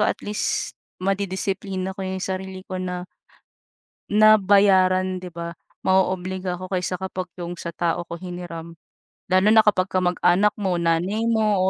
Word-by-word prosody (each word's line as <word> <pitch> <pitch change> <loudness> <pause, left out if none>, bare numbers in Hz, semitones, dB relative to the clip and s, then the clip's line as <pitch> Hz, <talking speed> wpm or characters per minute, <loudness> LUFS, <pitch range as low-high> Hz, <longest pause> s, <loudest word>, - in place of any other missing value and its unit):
at 210 - +2
least, 210 0 -1 0.3
madidisiplina 190 0 -2
ko 195 - -10
'yong 190 0 -3
sarili 190 0 -5
ko 185 - -6
na 180 -1 -4 1.1
na 215 +1 +6
bayaran, 185 -2 +4
'di 180 - -7
ba? 170 0 -6 0.3
Mao-obliga 185 -1 +1
ako 185 +1 -8
kaysa 180 0 -1
kapag 185 0 -5
'yong 175 0 -5
sa 170 - -4
tao 175 0 0
ko 170 - -5
hiniram. 175 -2 -7 0.6
Lalo 185 +3 +5
na 220 0 +6
kapag 195 -3 +2
kamag-anak 185 +2 +2
mo, 190 -3 0
nanay 175 +6 0
mo, 220 -3 +2
185 Hz, 145 wpm, -23 LUFS, 180-195 Hz, 1.1 s, na